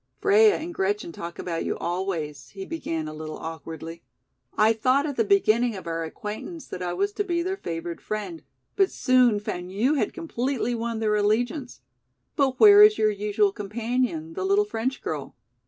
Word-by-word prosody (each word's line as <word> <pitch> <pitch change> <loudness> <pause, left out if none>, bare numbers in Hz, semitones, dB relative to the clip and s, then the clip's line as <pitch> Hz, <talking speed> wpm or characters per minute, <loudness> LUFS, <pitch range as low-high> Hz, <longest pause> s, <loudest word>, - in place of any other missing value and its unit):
"Freia 420 +1 +5
and 340 +2 -6
Gretchen 200 - -1
talk 170 +1 -8
about 165 -2 -3
you - - -2
always," 160 -7 -3
he 195 -1 -8
began 165 - -4
a 155 - -6
little 155 0 -7
awkwardly. 165 +1 -7 0.6
"I 215 +1 +5
thought 255 +6 +2
at 290 -3 -3
the 230 - +2
beginning 215 +3 +3
of 190 - -8
our 165 0 -3
acquaintance 210 - -7
that 180 - -6
I 180 -1 -2
was 400 - 0
to 410 - -1
be 345 -3 -1
their 375 +2 -2
favored 170 - -5
friend, 215 +11 -5 0.3
but 390 -2 +3
soon 250 -5 +3
found 180 -3 -5
you 230 +9 +1
had 290 - 0
completely 265 -7 -2
won 230 -1 -3
their 215 -1 +1
allegiance. 240 +6 0 0.5
But 270 -3 +1
where 415 -1 +9
is 425 0 +8
your 215 0 +3
usual 205 0 +1
companion, 210 -5 -2
the 185 - -4
little 200 +2 +3
French 225 +5 -3
girl?" 150 -3 -5
215 Hz, 180 wpm, -25 LUFS, 175-265 Hz, 0.6 s, where